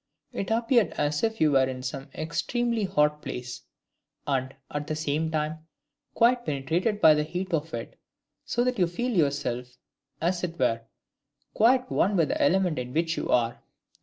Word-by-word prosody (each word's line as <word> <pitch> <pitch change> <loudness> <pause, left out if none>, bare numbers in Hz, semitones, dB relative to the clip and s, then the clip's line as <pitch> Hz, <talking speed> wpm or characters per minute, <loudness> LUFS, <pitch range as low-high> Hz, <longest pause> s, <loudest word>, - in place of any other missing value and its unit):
It 195 - -3
appeared 230 -2 +2
as 145 0 0
if 225 0 0
you 155 -1 +4
were 135 -1 +4
in 130 -1 -6
some 135 +2 -5
extremely 230 +7 -1
hot 150 -5 +1
place, 125 -2 -6 0.6
and, 135 -1 -1 0.2
at 145 0 -4
the 155 - -2
same 155 +1 -1
time, 155 0 -3 0.5
quite 240 +1 +4
penetrated 165 - -1
by 160 -5 +8
the 150 - +1
heat 180 +4 -4
of 160 0 -1
it, 115 - -8 0.4
so 240 - 0
that 250 -3 -1
you 180 - +4
feel 240 +9 -2
yourself, 125 - -1 0.4
as 175 +2 0
it 170 -1 -3
were, 115 -6 +1 0.7
quite 255 +3 +3
one 200 +3 +2
with 165 -4 +2
the - - -1
element 180 -1 +2
in 125 +1 -6
which 165 0 +1
you - - -4
are. 120 -1 +1
160 Hz, 170 wpm, -27 LUFS, 140-195 Hz, 0.7 s, by